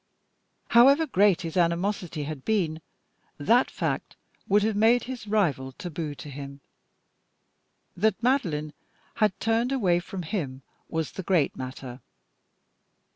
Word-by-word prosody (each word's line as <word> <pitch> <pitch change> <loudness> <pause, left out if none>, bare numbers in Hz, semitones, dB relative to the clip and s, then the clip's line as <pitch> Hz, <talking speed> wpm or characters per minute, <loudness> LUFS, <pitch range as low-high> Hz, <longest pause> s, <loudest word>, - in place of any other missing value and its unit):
However 275 +7 +6
great 200 - +3
his 165 -2 -5
animosity 175 -2 0
had 145 -2 -6
been, 170 -7 0 0.6
that 235 - +3
fact - - -3 0.3
would 205 +1 +3
have 220 0 +1
made 225 +4 +4
his 245 -4 -7
rival 155 -11 0
taboo 155 -1 -5
to 150 - -10
him. 140 0 -8 1.4
That 215 +4 +1
Madeline 165 - 0 0.4
had 210 -3 +1
turned 230 +3 +1
away 190 -10 +2
from 180 +1 -6
him 145 -8 -4 0.3
was 160 -2 -2
the - - -6
great 175 -6 +1
matter. 130 -1 -7
180 Hz, 125 wpm, -26 LUFS, 150-220 Hz, 1.4 s, However